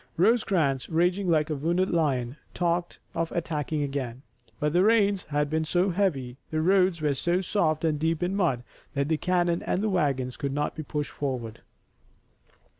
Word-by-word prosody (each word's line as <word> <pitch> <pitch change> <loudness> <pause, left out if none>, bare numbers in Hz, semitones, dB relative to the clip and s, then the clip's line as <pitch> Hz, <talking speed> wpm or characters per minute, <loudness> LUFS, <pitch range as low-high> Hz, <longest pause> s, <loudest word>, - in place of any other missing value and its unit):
Rosecrans, 175 - +2
raging 180 +3 +1
like 155 -1 +2
a - - 0
wounded 170 +6 0
lion, 135 -7 0 0.2
talked 175 0 0 0.2
of 165 0 -2
attacking 155 -2 -2
again, 135 -3 -4 0.4
but 150 0 0
the 175 - +4
rains 205 -2 +3
had 150 0 0
been 160 +2 0
so 180 +4 +1
heavy, 145 -10 -1
the 155 - -1
roads 185 0 +3
were 150 -2 +2
so 175 +6 0
soft 170 -5 0
and 155 -2 +1
deep 165 +2 0
in 185 +2 0
mud 160 -11 +1 0.3
that 140 +1 0
the 160 - +2
cannon 175 0 +1
and 190 - -1
the 215 - +1
wagons 140 -9 0
could 140 -1 -2
not 145 +1 -1
be 160 - -4
pushed 150 0 -3
forward. 125 -6 -4
160 Hz, 175 wpm, -27 LUFS, 145-180 Hz, 0.4 s, the